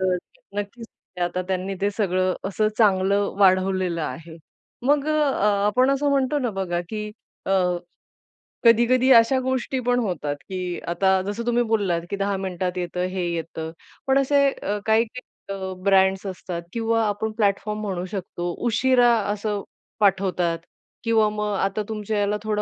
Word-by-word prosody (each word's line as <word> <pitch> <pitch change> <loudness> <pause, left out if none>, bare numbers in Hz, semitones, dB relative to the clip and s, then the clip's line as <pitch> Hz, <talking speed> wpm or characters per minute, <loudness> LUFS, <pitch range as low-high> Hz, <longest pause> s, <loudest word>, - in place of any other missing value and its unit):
तर 185 -1 +2 0.4
नक्कीच 205 +3 -5 0.4
आता 175 +1 -1
त्यांनी 190 +1 -2
ते 200 +1 +1
सगळं 185 -3 +1
असं 215 +2 +1
चांगलं 200 -1 +3
वाढवलेलं 185 -2 +3
आहे. 165 +1 -6 0.5
मग 290 +1 +3
अ, - - +2 0.5
आपण 255 +6 +3
असं 275 +1 +1
म्हणतो 275 +1 +2
ना 250 -4 -1
बघा 175 -3 -1
की 210 0 -4 0.4
अ, - - -1 1.1
कधी-कधी 240 +3 +5
अशा 235 +3 +5
गोष्टी 260 0 -1
पण 245 0 +3
होतात 175 -10 -2
की 180 -2 -3
आता 190 +2 +2
जसं 225 +3 -3
तुम्ही 240 0 +2
बोललात 205 -7 0
की 200 - -2
10 200 0 0
मिनिटात 185 -1 -3
येतं 180 0 -2
हे 185 -1 -2
येतं 160 -1 -5 0.4
पण 265 0 +4
असे 280 0 +3 0.4
काही-काही 225 +3 +1 0.4
अ, 190 -1 -4
ब्रँड्स 190 0 +3
असतात 180 -2 -5
किंवा 225 0 +1
आपण 210 +2 -2
प्लॅटफॉर्म 210 0 0
म्हणू 185 -4 -3
शकतो 175 -3 -4 0.2
उशिरा 245 +1 +4 0.2
असं 205 -1 -3 0.4
पाठवतात 185 -4 +2 0.4
किंवा 225 -2 +3
मग 210 0 -2
आता 195 +2 -1
तुमच्या 215 -1 -2
याला 205 +1 +1
थोडा 210 -1 0
205 Hz, 145 wpm, -23 LUFS, 185-230 Hz, 1.1 s, कधी-कधी